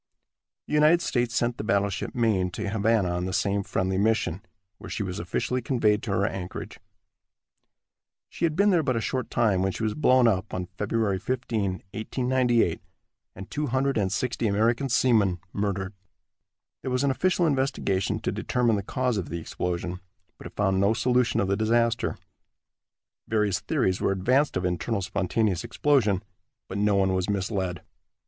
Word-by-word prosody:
The - - -7
United 155 +3 +5
States 120 -1 0
sent 120 0 0
the - - -2
battleship 100 -2 -1
Maine 110 -6 +2
to 105 - -4
Havana 105 -2 +1
on 90 +1 -2
the 95 - -3
same 100 0 +1
friendly 95 0 -1
mission, 100 -4 +1 0.4
where - - -9
she 105 - -3
was 90 -1 -4
officially 110 +9 -2
conveyed 110 -4 +1
to 105 - -4
her 95 +1 +1
anchorage. 95 -4 -5 1.5
She - - -8
had 155 -2 0
been 200 +3 +4
there 175 -3 +4
but 130 -4 0
a - - +1
short 130 +2 -2
time 105 -6 +2
when 95 0 +1
she 110 - -5
was 110 -1 0
blown 130 -5 +4
up, 95 -5 0
on 90 -1 -4
Feb. 105 -2 0
15, 120 -3 -2 0.3
1898, 125 -3 +1 0.5
and 95 +1 -10
260 125 -5 0
American 115 +6 +1
seamen 110 -8 +3
murdered. 100 -1 -2 0.9
There - - -4
was 125 +1 0
an 140 - +3
official 180 +4 +1
investigation 135 - 0
to - - -1
determine 120 -3 +1
the - - -1
cause 125 +3 -1
of 95 - -3
the 85 - -3
explosion, 90 +2 -3 0.4
but - - -8
it - - -15
found 95 -2 +1
no 100 +3 +3
solution 125 +1 +2
of 100 - +1
the 100 - +1
disaster. 115 +2 +1 1.1
Various 105 -3 +1
theories 105 - 0
were - - +2
advanced 125 +10 +2
of 90 - -2
internal 95 +4 -1
spontaneous 95 0 0
explosion, 110 -10 +1 0.4
but 100 - -4
no 105 0 +3
one 95 -1 +2
was 95 +1 -1
misled. 95 -3 -2
105 Hz, 165 wpm, -26 LUFS, 95-125 Hz, 1.5 s, United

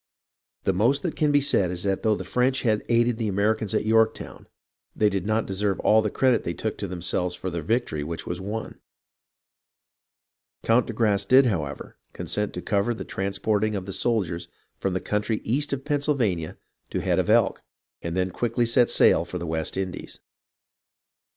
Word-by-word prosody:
The 95 - +1
most 120 +9 +2
that 175 - -2
can 150 -1 +2
be 145 0 +4
said 100 -9 +3
is 90 0 -3
that 100 -1 0
though 110 -1 +2
the - - -5
French 130 +2 0
had 110 -3 +1
aided 120 0 +3
the 115 -2 -2
Americans 105 +1 0
at - - 0
Yorktown, 110 0 +1 0.5
they 105 - +3
did 95 -1 -3
not 110 +1 +1
deserve 100 0 -1
all 110 +1 +5
the 105 - -1
credit 130 +2 +2
they 85 - -3
took 110 - -3
to 100 - -3
themselves 90 0 -2
for 95 +1 -5
the 85 -1 -3
victory 85 -4 -1
which 80 +2 -5
was 90 +1 -4
won. 105 +3 -5 1.8
Count 115 +2 +3
de 115 - -4
Grasse 105 -3 +1
did, 130 +5 +6
however, 80 - -3 0.2
consent 105 0 -2
to 90 - -5
cover 105 +3 0
the - - -7
transporting 105 +2 -1
of 95 -2 -4
the 95 - -6
soldiers 95 -9 -1 0.3
from 95 -2 -1
the 95 - -1
country 105 +1 -1
east 145 +6 -1
of 135 0 -3
Pennsylvania 140 - 0 0.3
to - - -3
the - - -3
Head - - +2
of - - 0
Elk, - - +3 0.4
and 85 +1 -4
then 95 0 0
quickly 120 +4 0
set 120 +1 +3
sail - - +5
for 90 - -6
the 85 - -5
West 80 +1 -2
Indies. 95 -1 -5
105 Hz, 190 wpm, -25 LUFS, 95-115 Hz, 1.8 s, did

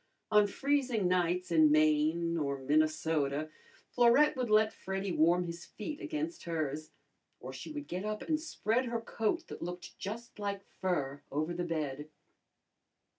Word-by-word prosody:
On 210 -1 +6
freezing 255 -3 +1
nights 180 0 +1
in 155 -2 +6
Maine 155 +2 +3
or 140 -4 -1
Minnesota, 155 +1 +1 0.4
Florette 245 +5 +5
would 250 -3 -2
let 215 0 +4
Freddy 195 0 -3
warm 170 +2 +4
his 170 0 -6
feet 295 - -7
against 315 +1 -4
hers, 155 -2 -2 0.5
or - - -8
she - - -7
would 295 -1 -6
get 180 +2 -4
up 215 0 -3
and 310 -1 0
spread 255 -6 0
her 235 -1 -2
coat 225 +9 -1
that - - -8
looked 180 +1 -7
just 225 +3 -6
like 200 -1 -3
fur 145 -7 -2
over 155 +4 -1
the 175 +1 -2
bed. 150 -3 -3
180 Hz, 150 wpm, -32 LUFS, 155-230 Hz, 0.5 s, On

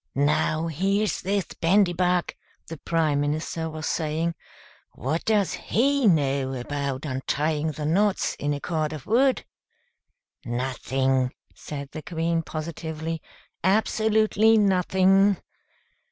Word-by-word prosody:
"Now, 150 +3 +1
here's 195 +6 0
this 195 0 0 0.2
Bandybug," 180 -1 +2 0.3
the 165 - -8
Prime 155 -3 0
Minister 155 +2 -2
was 155 0 -6
saying. 160 +1 -1 0.6
"What 155 +6 -2
does 210 -4 +2
he 275 +1 +1
know 140 -6 +2
about 140 +1 -3
untying 150 +3 -1
the 150 +1 -5
knots 195 +6 +1
in 145 - -1
a - - -5
cord 155 -1 -2
of 150 -4 -8
wood?" 260 +4 +2 1.0
"Nothing!" 130 +1 -1 0.2
said 140 -2 -7
the 155 - -6
Queen, 165 0 -1
positively. 160 0 -5 0.4
"Absolutely 220 +2 +3
nothing!" 195 0 +3
160 Hz, 110 wpm, -25 LUFS, 145-195 Hz, 1.0 s, Absolutely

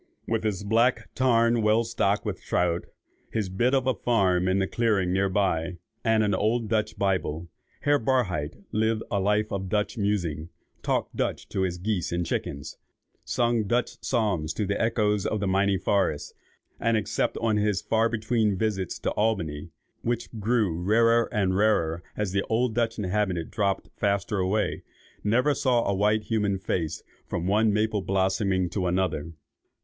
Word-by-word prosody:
With 115 -1 0
his 100 -3 -1
black 115 +4 +2
tarn 115 -2 +3
well 110 +2 +3
stocked 110 -3 0
with 100 -3 -3
trout, 90 -1 0 0.5
his 105 -4 -1
bit 120 +8 +1
of 135 -1 +1
a 130 - +2
farm 95 -5 +1
in 95 +1 +2
the 95 - +2
clearing 100 -6 +1
near 95 +1 +2
by, 90 -3 0 0.3
and 110 -1 +3
an 105 -1 +1
old 110 +4 +1
Dutch 110 -1 0
Bible, 85 -4 -1 0.3
Herr 145 0 +3
Barhydt 100 - -1
lived 110 +1 +1
a 100 - +1
life 105 +2 +1
of 95 -2 -3
Dutch 105 +3 -1
musing, 85 -6 -1 0.3
talked - - -1
Dutch - - -2
to 95 - -2
his 90 -2 -1
geese 95 -1 -2
and 85 0 -1
chickens, 70 -3 -4 0.4
sung 120 -2 +1
Dutch 120 +3 -1
psalms 100 -10 0
to 105 - -1
the 100 +1 -1
echoes 105 -3 +1
of 110 - -1
the 100 - -1
mighty 95 +1 +2
forest, 95 -5 0 0.5
and, 115 -1 +2
except 105 - -1
on 110 -2 +1
his 105 -2 +1
far 115 +1 +2
between 110 -2 0
visits 100 -4 -1
to - - -2
Albany, 90 -9 -1 0.3
which 120 0 -2
grew 105 -5 +1
rarer 115 +4 +3
and 95 -4 +1
rarer 85 -6 +2 0.2
as 105 -3 -1
the 100 +1 +1
old 115 +1 +1
Dutch 115 0 0
inhabitants 95 -4 -1
dropped 100 -3 -1
faster 100 0 0
away, 95 +4 0 0.4
saw 105 - -1
never 125 +7 +3 0.4
a 100 - +2
white 105 +2 +2
human 105 -3 0
face 85 -4 -3 0.2
from 85 - -3
one 105 +3 +3
maple 105 0 +1
blossoming 95 0 +1
to 90 -1 -1
another. 85 -3 -1
105 Hz, 165 wpm, -26 LUFS, 95-110 Hz, 0.5 s, tarn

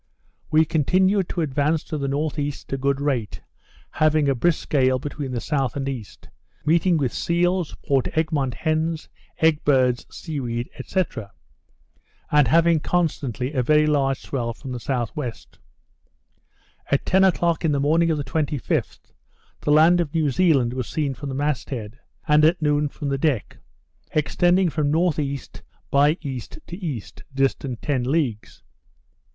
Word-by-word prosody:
We 155 +1 +4
continued 185 +5 +2
to 175 - -2
advance 150 +1 0
to 155 - -5
the 140 - -2
N.E. 145 +1 -1 0.2
at - - -7
a - - 0
good 140 +1 0
rate, 130 -7 -2 0.5
having 155 -1 +2
a 135 - +3
brisk 160 +6 0
gale 130 -3 +3
between 145 +1 -5
the 125 - -3
S. 135 0 -1
and 135 -1 -3
E.; 130 -5 -3 0.6
meeting 170 +2 +3
with 135 -5 -1
seals, 175 0 0
Port 135 -2 +2
Egmont 145 -6 0
hens, 160 +1 -1 0.3
egg 160 -2 +2
birds, 130 -4 +2
sea 160 -5 -6
weed, 120 -1 -4
&c. 190 - +1 1.3
and 150 -3 +5
having 165 +4 +4
constantly 145 - -1
a 130 - +1
very 150 +4 +4
large 140 -3 +1
swell 120 -4 -3
from 135 +2 -8
the 125 - -3
S.W. 125 +2 -2 1.6
At 140 - +1
ten 190 +1 +4
o'clock 170 -3 +2
in 160 - +2
the 140 - +1
morning 160 +4 +3
of 160 - +1
the 145 - -2
25th, 145 -1 -2 0.5
the 150 - -1
land 165 +4 +6
of 165 -1 -5
New 155 -3 +2
Zealand 135 -7 +3
was 130 -3 -4
seen 145 -3 -1
from 140 +2 -7
the 135 - -4
mast 145 0 -1
head; 115 -2 -6 0.3
and 150 0 +5
at 165 +3 +4
noon, 150 -1 +1
from 140 0 -5
the 135 -1 -1
deck; 135 -7 -1 0.6
extending 175 +4 +2
from 150 -2 0
N.E. 150 -5 0 0.5
by 145 +3 +4
E. 135 -4 -4
to 175 - -11
E., 135 - -3 0.3
distant 135 -2 -1
ten 140 -4 0
leagues. 130 -5 -2
145 Hz, 155 wpm, -23 LUFS, 135-160 Hz, 1.6 s, land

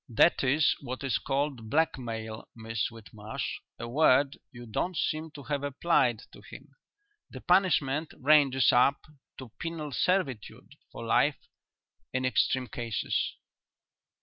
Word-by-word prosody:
"That 120 +9 +4
is 145 +3 +3
what 130 0 -6
is 135 - 0
called 135 -5 -2
blackmail, 115 -8 -2
Miss 115 -1 -2
Whitmarsh; 110 -1 -6 0.2
a 115 - -6
word 140 +1 +3 0.2
you 120 -1 -10
don't 160 - -2
seem 155 +1 -1
to 145 - -9
have 145 -1 -2
applied 135 -5 +1
to - - -14
him. - - -13 0.6
The - - -9
punishment 160 -5 +2
ranges 135 -3 +5
up 130 +3 +3 0.3
to 130 -4 -10
penal 165 -3 -5
servitude 140 - -1 0.2
for - - -8
life - - +3 0.8
in 130 0 0
extreme 130 0 +1
cases." 115 -3 -2
135 Hz, 125 wpm, -29 LUFS, 120-150 Hz, 0.8 s, ranges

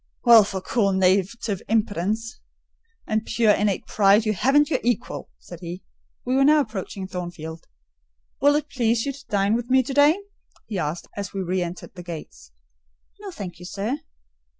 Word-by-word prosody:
"Well, 235 -3 +8
for 195 -1 -4
cool 200 -1 +1
native 190 +2 +1
impudence 220 +3 -1 0.7
and 215 0 0
pure 225 -2 +2
innate 205 -2 +1
pride, 205 +1 +4
you 215 - +1
haven't 275 - +3
your - - +2
equal," 245 +1 -2
said 175 - -12
he. 175 +1 -7 0.4
We 255 +1 0
were 270 - +4
now 300 +2 +6
approaching 200 -5 -5
Thornfield. 175 -3 -7 0.7
"Will 285 +1 +5
it 300 0 -1
please 235 -4 0
you 280 - -2
to 275 +1 -14
dine 200 0 +2
with 240 +1 -2
me 260 0 +4
to 270 - -5
day?" 290 +5 +5 0.5
he 205 -4 -4
asked, 155 +2 -3
as 200 -1 -5
we 195 - -2
re 185 +1 -1
entered 175 0 -6
the 180 - -9
gates. 165 - -9 0.7
"No, 410 -1 -7
thank 200 - -8
you, 180 - -10
sir." 210 +10 -3
210 Hz, 175 wpm, -24 LUFS, 185-245 Hz, 0.7 s, Well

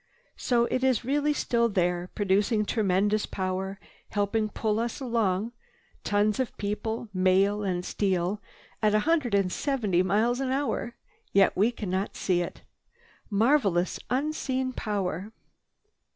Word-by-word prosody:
"So 240 -2 +2
it 255 +2 -1
is 255 -3 +2
really 290 +3 +1
still 235 -5 +1
there, 180 -2 0
producing 205 +2 +2
tremendous 205 0 +1
power, 190 +1 -3 0.3
helping 215 +1 0
pull 215 0 -1
us 235 0 -2
along—tons 225 - -2
of 260 - -2
people, 220 +2 -3
mail 190 +2 +3
and 180 -3 -2
steel—at 200 +2 -1
a - - +5
hundred 300 -8 +1
and 195 -2 +2
seventy 215 -11 +1
miles 220 +7 +1
an 270 -1 -1
hour! 275 +2 0
And 235 - -8 0.4
yet 195 -1 +4
we 210 +5 +3
cannot 195 -5 -3
see 180 -2 +1
it. 175 - -6 0.7
Marvelous! 205 - +2
Unseen 260 -1 -1
power! 200 -2 -3
210 Hz, 125 wpm, -27 LUFS, 190-240 Hz, 0.7 s, a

